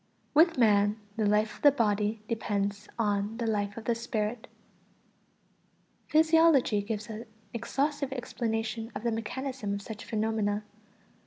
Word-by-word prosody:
=With 325 +2 +5
man 210 -2 +4 0.2
the 215 -2 +1
life 210 +1 +2
of - - -21
the 290 - +8
body 215 -3 0
depends 205 -2 -2
on 210 0 0
the 235 - -2
life 205 -2 -1
of 225 - -7
the 235 - +2
spirit=. 225 -1 -3 1.6
Physiology 315 -8 +4
gives 210 0 -4
an 220 +1 -7 0.3
exhaustive 280 +4 -1
explanation 225 -2 -3
of 205 - -5
the 235 - +1
mechanism 225 -1 -3
of 200 - -5
such 215 0 -7
phenomena. 215 -1 -1
225 Hz, 135 wpm, -29 LUFS, 210-245 Hz, 1.6 s, the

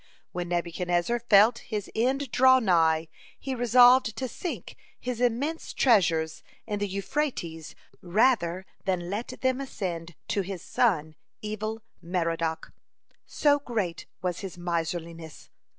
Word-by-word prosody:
When 175 -1 -4
Nebuchadnezzar 175 +5 0
felt 230 0 +5
his 210 -3 -5
end 260 +3 0
draw 260 +1 +6
nigh, 165 -7 +3 0.3
he 270 - -4
resolved 245 -1 +5
to 260 - -2
sink 345 +7 -6 0.2
his 245 -1 -4
immense 265 +7 -1
treasures 165 - +2 0.2
in 210 -2 -3
the 205 - -1
Euphrates 190 - -3 0.3
rather 185 -2 +2 0.2
than 180 -2 -1
let 215 +4 -3
them 260 +1 +1
ascend 175 - -5
to 200 - +1
his 185 -2 -6
son 155 -10 +1 0.3
Evil 215 +1 -4 0.2
merodach, 165 -2 -2 0.5
so 290 -1 +3
great 215 -11 -3 0.2
was 180 -2 -1
his 190 -2 -7
miserliness. 170 -1 -4
200 Hz, 120 wpm, -27 LUFS, 170-245 Hz, 0.5 s, draw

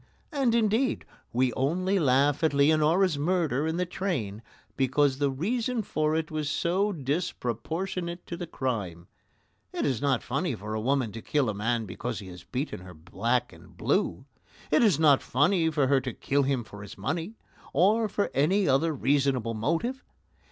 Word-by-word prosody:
And, 270 -6 +1
indeed, 230 +3 +1 0.3
we 125 0 +1
only 185 - +1
laugh 140 0 +3
at 155 -3 +2
Leonora's 155 +3 +3
murder 155 -3 +1
in 160 +1 -1
the 180 - 0
train 145 - -3 0.3
because 135 +1 +2
the 140 -1 +2
reason 225 - -1
for 155 -3 0
it 160 -1 -2
was 155 -2 -2
so 185 +7 +1
disproportionate 170 - -3
to 170 - -5
the 175 0 -6
crime. 100 - -3 0.7
It - - -2
is 130 -5 0
not 140 -4 +1
funny 140 +2 -1
for 105 +1 -6
a 110 - -2
woman 130 -2 +1
to 115 - -8
kill 140 -2 +1
a - - -1
man 115 +3 -1
because 105 +6 -5
he 100 -3 -8
has 90 -1 -11
beaten 130 - -4
her 90 -1 -12
black 115 +9 -1
and 80 0 -17
blue. - - 0 0.5
It 155 - +4
is 195 -10 +4
not 145 -4 +5
funny 160 +5 +2
for 150 -3 +1
her 135 0 +3
to 125 -1 -4
kill 140 +5 0
him 135 -3 0
for 100 -1 -11
his 100 - -10
money, 170 +8 -3 0.4
or 210 +8 +3
for 205 +1 -1
any 185 +8 +2
other 150 +4 +2
reasonable 130 -3 +1
motive. 170 - -1
145 Hz, 175 wpm, -28 LUFS, 125-175 Hz, 0.7 s, not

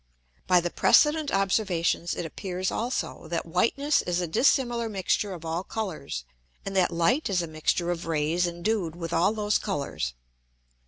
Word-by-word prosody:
By 180 -1 +5
the 175 0 -2
Precedent 300 -1 +4
Observations 190 -4 +1
it 175 - -4
appears 185 +2 -3
also, 235 -7 -3
that 165 +1 -2
whiteness 230 - +2
is 175 0 -1
a 180 - 0
dissimilar 240 - +2
mixture 200 0 0
of 170 -3 -7
all 165 +2 -2
Colours, 160 - -5 0.4
and 195 0 -4
that 185 -2 +4
Light 195 - +1
is 180 -3 +1
a - - -4
mixture 160 +2 0
of 170 -1 -4
Rays 165 +2 +1
endued 175 0 -2
with 170 -1 -5
all 175 +5 +3
those 210 -1 +1
Colours. 140 - -3
180 Hz, 160 wpm, -27 LUFS, 165-210 Hz, 0.4 s, By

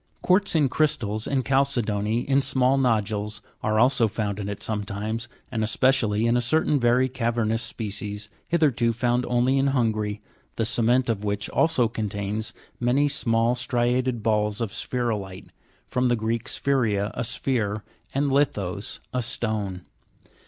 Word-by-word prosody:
Gluartz 185 0 +2
in 150 -3 +4
crystals, 115 -7 0
and 135 -2 0
chalcedony 115 -5 +1
in 135 +1 +2
small 135 0 +2
nodules 105 -4 0 0.2
are 110 0 +1
also 125 -1 +4
found 105 -1 -3
in 100 -1 -4
it 100 - -5
sometimes, 105 +2 -3 0.2
and 110 -3 -1
especially 110 -2 +2
in 115 +1 +3
a 120 - +2
certain 145 +4 +2
very 125 +1 +3
cavernous 115 -3 0
species, 105 -2 -4 0.2
hitherto 140 -9 +2
found 120 +1 0
only 125 +2 +2
in 135 - +2
Hungary, 110 -6 0 0.4
the 115 - 0
cement 120 +3 +2
of 110 -3 -1
which 105 0 -2
also 145 -8 +3
contains 105 -1 -3 0.3
many 125 +4 +2
small 115 -4 +1
striated 125 -1 0
balls 105 -1 +1
of 115 -4 -2
sphe'rolite 105 -5 -3 0.4
(from 125 0 +1
the 120 - +3
Greek 115 +1 -2
spheira, 110 -7 0
a 120 - -3
sphere, 110 -4 -1 0.3
and 140 +1 0
lithas, 105 -9 -1
a 125 - 0
stone). 110 -6 -2
115 Hz, 145 wpm, -25 LUFS, 105-130 Hz, 0.4 s, in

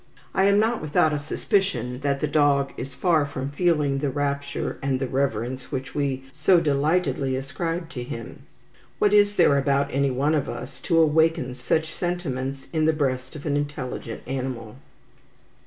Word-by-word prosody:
I 190 - +3
am 200 0 +5
not 225 +2 +2
without 155 0 +2
a 150 - 0
suspicion 145 - -1
that 140 0 -1
the 150 - +1
dog 145 -2 +2
is 130 0 -7
far 165 0 +3
from 140 -1 -4
feeling 150 -4 +1
the 145 0 0
rapture 140 0 -2
and 135 -1 0
the 135 - -1
reverence 130 -1 -2
which 130 +1 -4
we 140 -3 -1
so 180 +5 +4
delightedly 145 -2 +1
ascribe 165 +6 -3
to 135 -8 -6
him. 115 -2 -7 0.6
What 205 -1 +3
is 205 0 +5
there 140 -7 +5
about 140 0 +1
any 140 +1 +2
one 135 +4 +1
of 150 -3 0
us 125 - -7
to 165 - +4
awaken 160 -4 +3
such 155 +5 -1
sentiments 135 -7 -3
in 155 -1 +2
the 160 - +4
breast 130 -3 -2
of 150 - -8
an 145 -2 0
intelligent 145 -5 -4
animal? 125 -3 -4
140 Hz, 170 wpm, -24 LUFS, 130-160 Hz, 0.6 s, am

